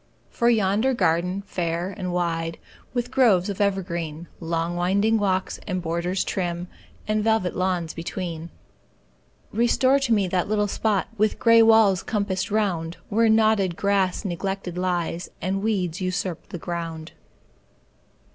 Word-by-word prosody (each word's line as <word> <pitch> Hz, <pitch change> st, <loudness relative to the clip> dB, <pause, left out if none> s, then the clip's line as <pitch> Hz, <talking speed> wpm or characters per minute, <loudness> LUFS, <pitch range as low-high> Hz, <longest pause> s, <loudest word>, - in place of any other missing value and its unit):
For 235 Hz, -, +2 dB
yonder 220 Hz, +3 st, +2 dB
garden, 180 Hz, 0 st, +1 dB
fair 175 Hz, 0 st, -2 dB
and 180 Hz, -1 st, -4 dB
wide, 165 Hz, -2 st, -1 dB, 0.3 s
With 245 Hz, 0 st, -2 dB
groves 215 Hz, -8 st, +4 dB
of 200 Hz, 0 st, -3 dB
evergreen, 170 Hz, -5 st, -2 dB
Long 165 Hz, 0 st, -2 dB
winding 200 Hz, +5 st, +2 dB
walks, 190 Hz, -2 st, 0 dB
and 185 Hz, -2 st, -1 dB
borders 170 Hz, +2 st, -1 dB
trim, 175 Hz, -1 st, -3 dB, 0.4 s
And 215 Hz, 0 st, +1 dB
velvet 220 Hz, -5 st, +1 dB
lawns 180 Hz, -3 st, -1 dB
between; 165 Hz, -1 st, -5 dB, 1.0 s
Restore 255 Hz, +4 st, +3 dB
to 270 Hz, -4 st, -1 dB
me 205 Hz, -4 st, +3 dB
that 180 Hz, -1 st, 0 dB
little 210 Hz, 0 st, +1 dB
spot, 205 Hz, -1 st, 0 dB
With 215 Hz, 0 st, +2 dB
gray 230 Hz, -1 st, +6 dB
walls 220 Hz, -4 st, +5 dB
compassed 200 Hz, -4 st, -2 dB
round, 180 Hz, -6 st, -1 dB
Where 225 Hz, +2 st, +3 dB
knotted 215 Hz, -5 st, +3 dB
grass 200 Hz, 0 st, +1 dB
neglected 190 Hz, 0 st, -3 dB
lies, 175 Hz, -1 st, -2 dB
And 195 Hz, +1 st, -1 dB
weeds 195 Hz, -4 st, -1 dB
usurp 185 Hz, -2 st, -3 dB
the -, -, -5 dB
ground. 165 Hz, -2 st, -5 dB
185 Hz, 135 wpm, -24 LUFS, 175-215 Hz, 1.0 s, gray